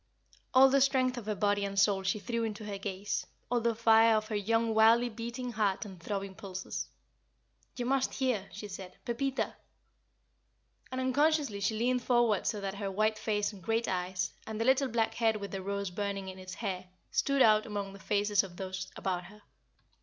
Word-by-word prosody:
All 265 +1 +9
the 275 +1 +3
strength 260 -2 +3
of 215 - -11
her 215 - 0
body 205 +1 +1
and 200 0 -3
soul 200 -1 +4
she 190 +2 0
threw 230 +3 -2
into 215 -1 -4
her 200 -1 -5
gaze 195 0 -3 0.2
all 240 -1 +2
the 230 0 +1
fire 225 0 +6
of 215 0 -1
her 215 - -2
young 225 +2 +1
wildly 225 +2 +5
beating 235 +2 -5
heart 215 -2 0
and 190 -4 -10
throbbing 195 +1 -4
pulses. 190 -2 -5 0.9
"You 245 - -3
must 265 +1 +1
hear," 250 -7 0
she 210 +1 -7
said. 190 -2 -9
"Pepita! 270 +3 0
Pepita!" - - -10 1.4
And 260 0 -2
unconsciously 285 -3 +2
she 210 +2 0
leaned 250 +2 +1
forward 240 -5 +2
so 210 - 0
that 195 -1 -3
her 200 0 -3
white 215 +2 +1
face 210 -1 0
and 195 - -12
great 225 +5 0
eyes, 180 0 -1 0.2
and 220 -1 -4
the 225 - 0
little 265 +2 +4
black 225 -2 0
head 225 -2 +2
with 200 -1 -6
the 195 - -4
rose 200 0 -3
burning 200 0 -3
in 190 0 -9
its 185 0 -8
hair, 185 -4 -4 0.2
stood 275 -1 +3
out 215 0 +5
among 200 -2 -4
the 195 - -11
faces 205 0 +2
of 180 -3 -10
those 190 0 -5
about 180 -2 -2
her. 210 +3 -15
215 Hz, 200 wpm, -31 LUFS, 195-235 Hz, 1.4 s, All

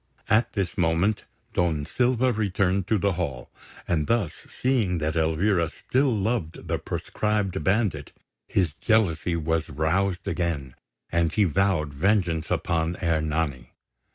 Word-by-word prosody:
At 110 +2 +3
this 95 -4 -2
moment 90 +5 +1 0.3
Don 80 -4 +1
Silva 125 +3 +2
returned 95 -3 0
to 110 - +2
the 100 +1 +1
hall; 75 -9 -4 0.4
and 80 -4 0
thus 115 -9 +1 0.2
seeing 115 -9 +1
that 80 0 -1
Elvira 85 +2 +2
still 130 - 0
loved 105 -5 -2
the - - -1
proscribed 105 -3 -2
bandit, 95 -8 0 0.4
his 90 -7 +1
jealousy 90 -1 +1
was 80 0 -1
roused 90 +6 0
again, 75 -8 -2 0.4
and 85 -1 +2
he 105 - +3
vowed 90 -4 +1
vengeance 85 -1 +1
upon 85 -1 0
Ernani. 80 -5 -1
90 Hz, 125 wpm, -25 LUFS, 80-100 Hz, 0.4 s, At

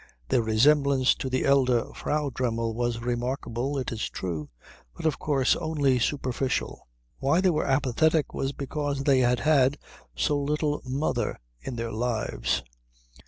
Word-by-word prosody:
Their 120 - +3
resemblance 135 +4 +4
to 130 - -4
the 130 - 0
elder 130 -4 +3
Frau 150 -2 -1
Dremmel 115 -2 -1
was 120 0 -2
remarkable, 120 +2 -2
it 130 - -3
is 115 -1 -3
true, 80 -6 -4 0.5
but - - -7
of 155 - +1
course 135 -4 +2
only 145 -6 +1
superficial. 130 - -2 0.3
Why 140 +5 +2
they 185 -1 +3
were 155 - -1
apathetic 145 +3 +2
was 135 - -1
because 140 0 -3
they 135 -2 +4
had 125 -1 +2
had 145 -2 +3 0.4
so 145 - +1
little 150 +1 -1
mother 135 +4 -1 0.2
in 130 - -5
their 115 -1 -3
lives. 110 - -1
130 Hz, 145 wpm, -27 LUFS, 120-145 Hz, 0.5 s, resemblance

